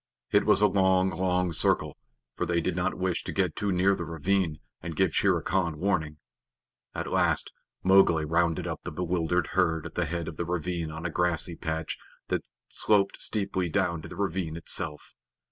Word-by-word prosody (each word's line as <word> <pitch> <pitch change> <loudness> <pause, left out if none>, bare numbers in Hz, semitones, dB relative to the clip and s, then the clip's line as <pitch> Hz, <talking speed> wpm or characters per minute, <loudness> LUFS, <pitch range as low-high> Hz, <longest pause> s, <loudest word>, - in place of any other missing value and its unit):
It - - +3
was - - +5
a 105 - +7
long, 95 -1 +3
long 90 -2 0
circle, - - +2 0.4
for - - -2
they 85 -1 +1
did 85 +1 -1
not 90 +1 0
wish 90 -2 -1
to - - -4
get 95 -5 0
too 100 -1 -1
near 95 +2 +3
the 85 - -3
ravine 85 +1 0 0.2
and 80 -1 -6
give - - +2
Shere - - +3
Khan 85 -4 0
warning. 80 -4 -1 0.8
At - - -4
last - - +2 0.3
Mowgli 95 -4 +5
rounded 85 +2 +1
up 85 -2 -4
the 90 - -6
bewildered 90 +1 0
herd 80 -4 +1
at - - -7
the 90 - 0
head 85 0 -3
of 80 - -6
the 85 - -2
ravine 85 -1 -2
on 80 +2 -7
a 85 - -1
grassy 85 0 0
patch 80 -2 -4 0.3
that - - -1 0.2
sloped 100 -2 +2
steeply 95 -4 0
down 85 -2 0
to - - -9
the 90 - -9
ravine 90 -4 -2
itself. 80 -2 -3
90 Hz, 185 wpm, -28 LUFS, 80-95 Hz, 0.8 s, a